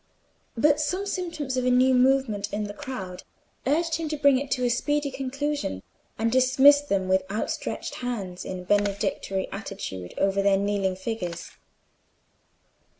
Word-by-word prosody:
But 295 Hz, +5 st, +4 dB
some 365 Hz, +6 st, -1 dB
symptoms 335 Hz, -9 st, -3 dB
of 255 Hz, -, +1 dB
a 250 Hz, -, +2 dB
new 255 Hz, +1 st, +4 dB
movement 250 Hz, -5 st, +2 dB
in 210 Hz, +1 st, -2 dB
the 205 Hz, 0 st, -5 dB
crowd 190 Hz, -6 st, -6 dB, 0.5 s
urged 320 Hz, +3 st, +1 dB
him 325 Hz, -2 st, -3 dB
to 305 Hz, -, -2 dB
bring 280 Hz, -2 st, +5 dB
it 280 Hz, 0 st, -5 dB
to 250 Hz, -, 0 dB
a -, -, +2 dB
speedy 290 Hz, +3 st, 0 dB
conclusion 270 Hz, -, -3 dB, 0.3 s
and 225 Hz, +1 st, 0 dB
dismiss 265 Hz, +3 st, +6 dB
them 195 Hz, -10 st, -1 dB
with 190 Hz, 0 st, +3 dB
hands 210 Hz, +3 st, -1 dB, 0.2 s
outstretched -, -, -5 dB
in 190 Hz, -6 st, -4 dB
a -, -, -10 dB
benedictory 200 Hz, -1 st, 0 dB
attitude 195 Hz, -, -6 dB
over 195 Hz, 0 st, +2 dB
their 195 Hz, 0 st, +4 dB
kneeling 200 Hz, -1 st, 0 dB
figures. 185 Hz, -4 st, -5 dB
250 Hz, 150 wpm, -26 LUFS, 195-285 Hz, 0.5 s, dismiss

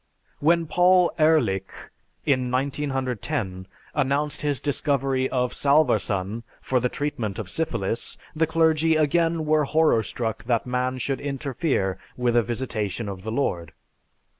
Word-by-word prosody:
When 165 Hz, +2 st, +3 dB
Paul 180 Hz, +2 st, +4 dB
Ehrlich, 155 Hz, -12 st, +1 dB, 0.3 s
in 130 Hz, -3 st, +1 dB
1910, 130 Hz, -6 st, -2 dB, 0.3 s
announced 145 Hz, +1 st, 0 dB
his 145 Hz, -3 st, 0 dB
discovery 135 Hz, -2 st, 0 dB
of 125 Hz, -1 st, 0 dB
salvarsan 115 Hz, -8 st, +1 dB, 0.2 s
for 130 Hz, -, 0 dB
the 125 Hz, +1 st, 0 dB
treatment 120 Hz, -9 st, -3 dB
of 105 Hz, -5 st, -5 dB
syphilis, 120 Hz, -9 st, -2 dB, 0.2 s
the 160 Hz, +1 st, +2 dB
clergy 160 Hz, 0 st, +3 dB
again 165 Hz, +1 st, +2 dB
were 155 Hz, -1 st, +3 dB
horror 155 Hz, -5 st, +3 dB
struck 110 Hz, 0 st, -4 dB
that 115 Hz, -2 st, +1 dB
man 125 Hz, +1 st, -1 dB
should 135 Hz, 0 st, -2 dB
interfere 135 Hz, -, -1 dB, 0.2 s
with 120 Hz, -1 st, +1 dB
a 120 Hz, -, +6 dB
visitation 115 Hz, -3 st, -3 dB
of 95 Hz, -2 st, -6 dB
the 110 Hz, +3 st, -5 dB
Lord. 85 Hz, -, -2 dB
135 Hz, 130 wpm, -24 LUFS, 115-155 Hz, 0.3 s, a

